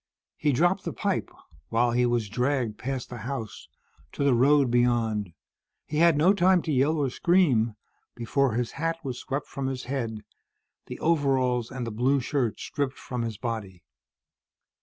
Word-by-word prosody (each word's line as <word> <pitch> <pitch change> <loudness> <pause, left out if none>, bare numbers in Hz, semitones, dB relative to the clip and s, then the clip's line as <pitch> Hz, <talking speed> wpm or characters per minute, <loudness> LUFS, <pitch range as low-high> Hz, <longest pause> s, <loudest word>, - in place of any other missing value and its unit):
He 150 - +1
dropped 175 +8 +2
the - - -4
pipe, 200 -3 -1 0.4
while 120 +1 +2
he 125 +1 +2
was 120 -3 0
dragged 125 0 -1
past 130 -1 -4
the 120 - -6
house, 115 -2 -6 0.5
to - - -2
the 140 -2 +4
road 135 +1 +4
beyond. 115 -5 +1 0.5
He 150 - -4
had 165 -1 +5
no 175 +6 +5
time 185 -2 +3
to 160 - -2
yell 145 +4 +2
or 140 -4 0
scream, 130 - +2 0.4
before 125 +2 0
his 120 +1 -1
hat 165 +3 -2
was 125 -2 -4
swept 140 +1 -3
from 135 -1 -4
his 130 -1 -4
head, 115 -5 -4 0.6
the - - -7
overalls 135 -7 +1
and 130 -2 -5
the 115 - -4
blue 130 +6 +2
shirt 130 -3 -1
stripped 140 -2 -3
from 125 -2 -5
his 115 -3 -3
body. 105 -7 -5
130 Hz, 165 wpm, -26 LUFS, 120-145 Hz, 0.6 s, had